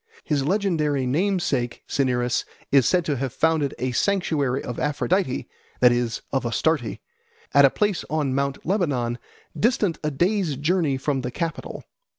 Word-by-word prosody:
His 145 -3 0
legendary 155 -6 +1
namesake 155 -5 0
Cinyras 125 -3 0 0.3
is 135 -4 +5
said 180 -2 +2
to 145 -4 0
have 135 0 -2
founded 160 -2 +1
a 130 0 -1
sanctuary 145 -6 0
of 120 - -5
Aphrodite, 150 +1 0 0.3
that 125 -1 +6
is, 120 -1 -1
of 135 - 0
Astarte, 120 +2 0 0.6
at 140 0 +7
a - - +6
place 205 +4 0
on 150 -4 0
Mount 140 0 -2
Lebanon, 140 - 0 0.4
distant 210 -7 +1
a 150 - +1
day's 175 +2 0
journey 150 -1 +1
from 135 0 -1
the 125 - -3
capital. 165 +5 -4
145 Hz, 150 wpm, -24 LUFS, 130-170 Hz, 0.6 s, at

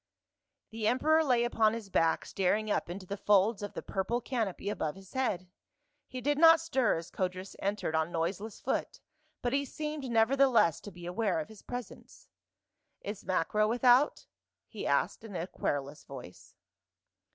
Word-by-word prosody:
The 220 -1 -2
emperor 310 +7 +3
lay 250 -5 +3
upon 225 -2 +2
his 215 -4 -8
back 165 -2 +2
staring 210 +3 0
up - - 0
into 185 +2 -6
the 200 +2 -5
folds 205 +1 +3
of 205 - -5
the - - -6
purple 210 +5 -1
canopy 225 -6 -3
above 160 -6 -2
his 195 -1 -14
head, 205 -9 -1 0.6
he 255 - -6
did 290 +3 +1
not 330 0 +8
stir 270 -8 +1
as 165 0 -8
Codrus 185 +1 -3
entered 200 -4 -2
on 160 +1 0
noiseless 190 +6 -3
foot - - -2 0.4
but 245 +1 0
he 280 +1 +2
seemed 300 0 -5
nevertheless 235 - +4
to 205 - -9
be 175 -1 -11
aware 180 0 0
of 155 - -5
his 220 -2 -13
presence. 245 -3 -9 0.4
" - - -52
Is 205 - -10
Macro 190 +4 +1
without?" 245 +4 +4 0.4
he - - -5
asked - - +1
in 215 -4 -9
a 170 0 -2
querulous 145 -5 -3
voice. 125 -9 -11
210 Hz, 165 wpm, -31 LUFS, 185-245 Hz, 0.6 s, not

